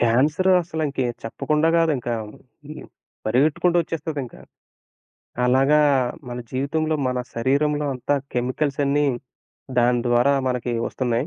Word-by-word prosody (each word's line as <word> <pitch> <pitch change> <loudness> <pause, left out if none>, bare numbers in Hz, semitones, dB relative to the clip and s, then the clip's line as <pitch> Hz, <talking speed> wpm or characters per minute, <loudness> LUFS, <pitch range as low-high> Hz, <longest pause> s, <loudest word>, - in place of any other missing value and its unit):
Cancer 145 +11 +3
అసల 160 -2 -4
ఇంక 140 - -11 0.3
చెప్పకుండా 150 +7 0
కాదింక. 155 -8 0 0.6
హ్మ్. 155 - -9 0.4
పరిగెత్తుకుంటూ 150 +9 +2
వచ్చేస్తుందింక. 155 -5 -5 1.1
అలాగా 135 +4 +4 0.5
మన 120 0 -5
జీవితంలో, 155 +4 -1
మన 125 0 -1 0.2
శరీరంలో 145 +5 +1
అంతా 130 +3 -1 0.2
కెమికల్స్ 130 +4 -1
అన్నీ 145 +1 +2 0.7
దాని 120 0 +3
ద్వారా 120 +3 +3 0.2
మనకి 125 -1 -2
వస్తున్నాయి. 125 +1 -1
140 Hz, 105 wpm, -22 LUFS, 125-155 Hz, 1.1 s, అలాగా